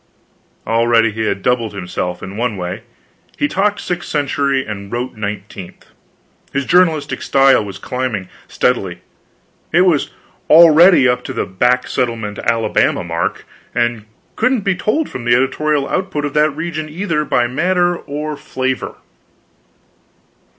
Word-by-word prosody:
Already 115 Hz, 0 st, +3 dB
he 110 Hz, +1 st, -3 dB
had 100 Hz, -1 st, -2 dB
doubled 115 Hz, -4 st, 0 dB
himself 90 Hz, -1 st, -4 dB
in 95 Hz, -, -7 dB
one 115 Hz, -2 st, -2 dB
way; 90 Hz, +4 st, -5 dB, 0.6 s
he 290 Hz, -, +1 dB
talked 205 Hz, -4 st, 0 dB
sixth 175 Hz, -1 st, -4 dB
century 140 Hz, -2 st, 0 dB
and 100 Hz, -2 st, -7 dB
wrote 120 Hz, +2 st, -3 dB
nineteenth. 100 Hz, -3 st, -7 dB, 0.7 s
His 140 Hz, 0 st, -1 dB
journalistic 160 Hz, -4 st, +2 dB
style 135 Hz, -4 st, +4 dB
was 100 Hz, -2 st, -7 dB
climbing, 115 Hz, -3 st, -3 dB, 0.2 s
steadily; 95 Hz, -8 st, -1 dB, 0.7 s
it 170 Hz, -, +4 dB
was 175 Hz, -6 st, +2 dB, 0.4 s
already 165 Hz, -1 st, +7 dB
up 125 Hz, 0 st, +1 dB
to 130 Hz, -, -5 dB
the 115 Hz, -, -2 dB
back 125 Hz, +7 st, +1 dB
settlement 115 Hz, -5 st, -2 dB
Alabama 115 Hz, -1 st, +1 dB
mark, 85 Hz, -1 st, -3 dB, 0.3 s
and 120 Hz, -3 st, 0 dB, 0.3 s
couldn't 255 Hz, 0 st, +1 dB
be 195 Hz, -1 st, +1 dB
told 215 Hz, -, -1 dB
from 125 Hz, -, -7 dB
the 120 Hz, 0 st, +3 dB
editorial 140 Hz, +2 st, +1 dB
output 155 Hz, -6 st, -2 dB
of 145 Hz, -, -4 dB
that 150 Hz, +1 st, +3 dB
region 155 Hz, +1 st, -5 dB
either 165 Hz, -2 st, -1 dB
by 125 Hz, -4 st, +1 dB
matter 175 Hz, +7 st, +1 dB
or 150 Hz, -1 st, -5 dB
flavor. 130 Hz, -2 st, -3 dB
130 Hz, 135 wpm, -17 LUFS, 110-155 Hz, 0.7 s, already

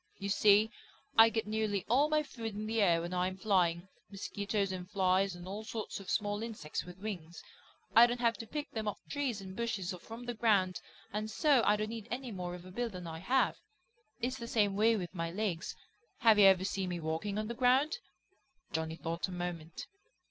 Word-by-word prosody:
You 200 Hz, 0 st, -4 dB
see, 210 Hz, +2 st, +5 dB, 0.4 s
I 225 Hz, 0 st, +9 dB
get 225 Hz, 0 st, -1 dB
nearly 215 Hz, -2 st, -1 dB
all 275 Hz, +6 st, +4 dB
my 305 Hz, 0 st, +2 dB
food 225 Hz, -6 st, -6 dB
in 210 Hz, +1 st, -4 dB
the 225 Hz, 0 st, 0 dB
air 170 Hz, -4 st, +4 dB
when 175 Hz, +1 st, -4 dB
I 180 Hz, 0 st, +1 dB
am 185 Hz, 0 st, -5 dB
flying, 180 Hz, -3 st, +2 dB, 0.2 s
mosquitoes 200 Hz, 0 st, -2 dB
and 180 Hz, -1 st, -6 dB
flies 190 Hz, -1 st, +2 dB
and 175 Hz, +1 st, -9 dB
all 205 Hz, +3 st, -5 dB
sorts 220 Hz, -1 st, -5 dB
of 195 Hz, -2 st, -9 dB
small 205 Hz, 0 st, 0 dB
insects 220 Hz, -9 st, -4 dB
with 180 Hz, +1 st, -11 dB
wings. 180 Hz, -5 st, -6 dB, 0.5 s
I 235 Hz, +1 st, +9 dB
don't 240 Hz, 0 st, -2 dB
have 235 Hz, -1 st, +2 dB
to 225 Hz, -, -7 dB
pick 295 Hz, +3 st, -5 dB
them 220 Hz, -1 st, -3 dB
off 210 Hz, -, -2 dB
trees 265 Hz, -8 st, -2 dB
and 190 Hz, -1 st, -8 dB
bushes 215 Hz, -5 st, -2 dB
or 180 Hz, -, -8 dB
from 230 Hz, +6 st, -9 dB
the 240 Hz, -, -3 dB
ground 205 Hz, -5 st, +2 dB, 0.3 s
and 215 Hz, +1 st, -2 dB
so 280 Hz, +2 st, +4 dB
I 210 Hz, -, +6 dB
don't 215 Hz, +1 st, -2 dB
need 225 Hz, -2 st, -6 dB
any 245 Hz, +1 st, -4 dB
more 180 Hz, -3 st, -4 dB
of 180 Hz, 0 st, -11 dB
a 185 Hz, -, -10 dB
bill 240 Hz, +4 st, -2 dB
than 180 Hz, -4 st, -8 dB
I 160 Hz, -1 st, -6 dB
have. 255 Hz, +9 st, +2 dB, 0.6 s
It's 255 Hz, +2 st, -2 dB
the 235 Hz, -, -6 dB
same 205 Hz, -4 st, +2 dB
way 225 Hz, +3 st, +4 dB
with 180 Hz, -3 st, -5 dB
my 165 Hz, -2 st, -2 dB
legs. 185 Hz, -2 st, -2 dB, 0.5 s
Have 220 Hz, -2 st, +6 dB
you 200 Hz, -, +9 dB
ever 190 Hz, -1 st, +6 dB
seen 190 Hz, -1 st, -2 dB
me 175 Hz, -1 st, -3 dB
walking 160 Hz, +6 st, -2 dB
on 215 Hz, 0 st, -2 dB
the 235 Hz, -, -3 dB
ground?" 265 Hz, -, +3 dB, 0.7 s
Johnny 160 Hz, 0 st, -2 dB
thought 165 Hz, +2 st, -3 dB
a -, -, -8 dB
moment. 175 Hz, -2 st, -5 dB
205 Hz, 215 wpm, -33 LUFS, 180-225 Hz, 0.7 s, I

